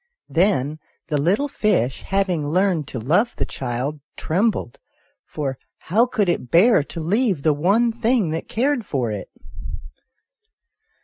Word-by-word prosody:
Then 155 Hz, -5 st, +1 dB, 0.3 s
the 150 Hz, -3 st, +1 dB
little 200 Hz, -, +2 dB
fish, 135 Hz, -, 0 dB
having 185 Hz, -7 st, 0 dB
learned 180 Hz, -3 st, +1 dB
to 130 Hz, -, -6 dB
love 165 Hz, -, +1 dB
the -, -, -2 dB
child, 130 Hz, +4 st, -4 dB, 0.2 s
trembled, 190 Hz, -, -1 dB, 0.5 s
for 135 Hz, -3 st, -4 dB, 0.2 s
how 225 Hz, +8 st, +2 dB
could 215 Hz, -5 st, 0 dB
it 170 Hz, -8 st, -1 dB
bear 190 Hz, -, +5 dB
to 165 Hz, -, -7 dB
leave 190 Hz, -, 0 dB
the 155 Hz, -, +4 dB
one 200 Hz, +11 st, +2 dB
thing 230 Hz, -6 st, +1 dB
that 160 Hz, -, -4 dB
cared 260 Hz, +1 st, 0 dB
for 130 Hz, -, -2 dB
it 100 Hz, -3 st, -5 dB
175 Hz, 135 wpm, -22 LUFS, 145-215 Hz, 0.5 s, bear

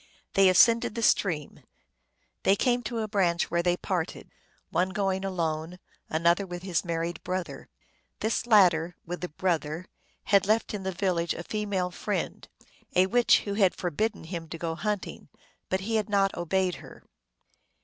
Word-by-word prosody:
They 195 Hz, -1 st, +6 dB
ascended 230 Hz, +4 st, +5 dB
the 230 Hz, -, -2 dB
stream; 160 Hz, -9 st, +1 dB, 0.8 s
they 195 Hz, -, +4 dB
came 245 Hz, +3 st, +1 dB
to 230 Hz, 0 st, -3 dB
a 215 Hz, -, -2 dB
branch, 185 Hz, -5 st, +1 dB
where 170 Hz, 0 st, +2 dB
they 175 Hz, 0 st, +1 dB
parted: 180 Hz, -4 st, -3 dB, 0.4 s
one 180 Hz, +3 st, +1 dB
going 190 Hz, -1 st, -1 dB
alone, 170 Hz, -2 st, -2 dB, 0.3 s
an 160 Hz, +2 st, -2 dB
other 170 Hz, +4 st, +4 dB
with 175 Hz, 0 st, -7 dB
his 185 Hz, -4 st, 0 dB
married 170 Hz, 0 st, -3 dB
brother. 185 Hz, -1 st, -4 dB, 0.5 s
This 220 Hz, +2 st, -1 dB
latter, 175 Hz, -6 st, +4 dB
with 175 Hz, +1 st, -5 dB
the 180 Hz, -, -3 dB
brother, 165 Hz, 0 st, -2 dB, 0.4 s
had 200 Hz, -2 st, +3 dB
left 220 Hz, +1 st, +1 dB
in 205 Hz, -, -3 dB
the 190 Hz, 0 st, -2 dB
village 175 Hz, -2 st, 0 dB
a 170 Hz, -, -6 dB
female 200 Hz, -3 st, -2 dB
friend, -, -, -3 dB, 0.5 s
a 185 Hz, +1 st, +6 dB
witch, 240 Hz, +5 st, +4 dB
who 200 Hz, -, -4 dB
had 200 Hz, -3 st, +3 dB
forbidden 200 Hz, +5 st, -2 dB
him 165 Hz, -1 st, -6 dB
to 165 Hz, -, -6 dB
go 165 Hz, 0 st, -3 dB
hunting, 205 Hz, +3 st, -4 dB, 0.4 s
but 190 Hz, 0 st, 0 dB
he 220 Hz, +3 st, 0 dB
had 215 Hz, 0 st, -2 dB
not 195 Hz, -1 st, +2 dB
obeyed 185 Hz, +1 st, 0 dB
her. -, -, -13 dB
185 Hz, 165 wpm, -27 LUFS, 170-205 Hz, 0.8 s, They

